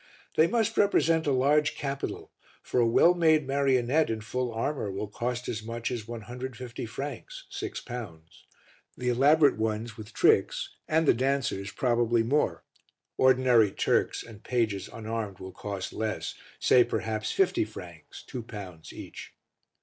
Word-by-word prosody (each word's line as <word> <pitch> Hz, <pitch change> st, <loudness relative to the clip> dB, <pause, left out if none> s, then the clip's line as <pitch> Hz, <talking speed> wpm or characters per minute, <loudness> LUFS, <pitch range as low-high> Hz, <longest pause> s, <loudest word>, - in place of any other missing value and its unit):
They 160 Hz, -, +5 dB
must 225 Hz, +2 st, 0 dB
represent 165 Hz, -6 st, +3 dB
a -, -, +3 dB
large 150 Hz, +3 st, +3 dB
capital, 140 Hz, -2 st, -4 dB, 0.3 s
for -, -, 0 dB
a 120 Hz, -, +4 dB
well 165 Hz, +9 st, +5 dB
made 160 Hz, -4 st, +3 dB
marionette 135 Hz, +1 st, +2 dB
in 110 Hz, -1 st, -2 dB
full 125 Hz, +2 st, -2 dB
armour 115 Hz, 0 st, -2 dB
will 100 Hz, +2 st, -4 dB
cost 120 Hz, +4 st, -3 dB
as 110 Hz, -, -3 dB
much 115 Hz, +2 st, -4 dB
as 115 Hz, -3 st, -4 dB
150 120 Hz, +1 st, -6 dB
francs 145 Hz, -, -7 dB
(6 395 Hz, -1 st, -5 dB
pounds), 85 Hz, -10 st, -9 dB, 0.5 s
the 125 Hz, -, -1 dB
elaborate 140 Hz, +3 st, +5 dB
ones, 110 Hz, 0 st, -2 dB
with 110 Hz, +1 st, -9 dB
tricks, -, -, +2 dB
and 160 Hz, 0 st, +2 dB
the -, -, +7 dB
dancers 130 Hz, -6 st, -1 dB
probably 120 Hz, -2 st, +2 dB
more; 140 Hz, +6 st, 0 dB, 0.5 s
ordinary 125 Hz, -5 st, +4 dB
Turks -, -, +1 dB
and 110 Hz, -2 st, -13 dB
pages 110 Hz, -6 st, -1 dB
unarmed 110 Hz, -3 st, -4 dB
will 95 Hz, +1 st, -8 dB
cost 100 Hz, -2 st, -5 dB
less, 110 Hz, -2 st, -3 dB, 0.3 s
say 125 Hz, -, +6 dB
perhaps 110 Hz, -2 st, -2 dB
50 195 Hz, -10 st, +2 dB
francs 85 Hz, -7 st, -10 dB
(2 125 Hz, -, -6 dB
pounds) 95 Hz, -8 st, -9 dB
each. -, -, -10 dB
120 Hz, 145 wpm, -28 LUFS, 110-140 Hz, 0.5 s, the